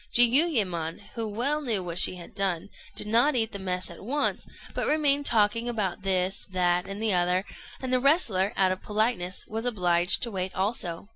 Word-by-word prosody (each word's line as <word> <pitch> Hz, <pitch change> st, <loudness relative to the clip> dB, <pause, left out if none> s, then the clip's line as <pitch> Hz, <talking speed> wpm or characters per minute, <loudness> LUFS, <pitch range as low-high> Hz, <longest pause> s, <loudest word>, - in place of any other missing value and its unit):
Jiuyémon, 230 Hz, -, +3 dB
who 230 Hz, -2 st, -4 dB
well 270 Hz, +8 st, -1 dB
knew 225 Hz, -9 st, -1 dB
what 175 Hz, 0 st, +1 dB
she 185 Hz, -, +6 dB
had 180 Hz, +5 st, -11 dB
done, 195 Hz, -3 st, -2 dB, 0.3 s
did -, -, +2 dB
not 235 Hz, +7 st, +3 dB
eat 225 Hz, -2 st, +1 dB
the 200 Hz, -, -7 dB
mess 185 Hz, -1 st, -3 dB
at 170 Hz, -, -12 dB
once, 285 Hz, +7 st, -2 dB, 0.3 s
but -, -, -2 dB
remained 290 Hz, -2 st, +3 dB
talking 230 Hz, +2 st, +1 dB
about 210 Hz, -5 st, -3 dB
this, 190 Hz, 0 st, -1 dB
that, 180 Hz, 0 st, 0 dB
and 195 Hz, +1 st, -6 dB
the 220 Hz, -3 st, +2 dB
other; 180 Hz, +1 st, +1 dB, 0.3 s
and 260 Hz, -1 st, -4 dB
the 255 Hz, -, +3 dB
wrestler, 240 Hz, -, +2 dB
out 190 Hz, -1 st, +3 dB
of 185 Hz, -, -4 dB
politeness, 210 Hz, -4 st, -1 dB
was 225 Hz, +1 st, -4 dB
obliged 180 Hz, -6 st, +2 dB
to 235 Hz, -, -3 dB
wait 185 Hz, -1 st, -4 dB
also. 190 Hz, -3 st, -3 dB
200 Hz, 190 wpm, -26 LUFS, 180-240 Hz, 0.3 s, she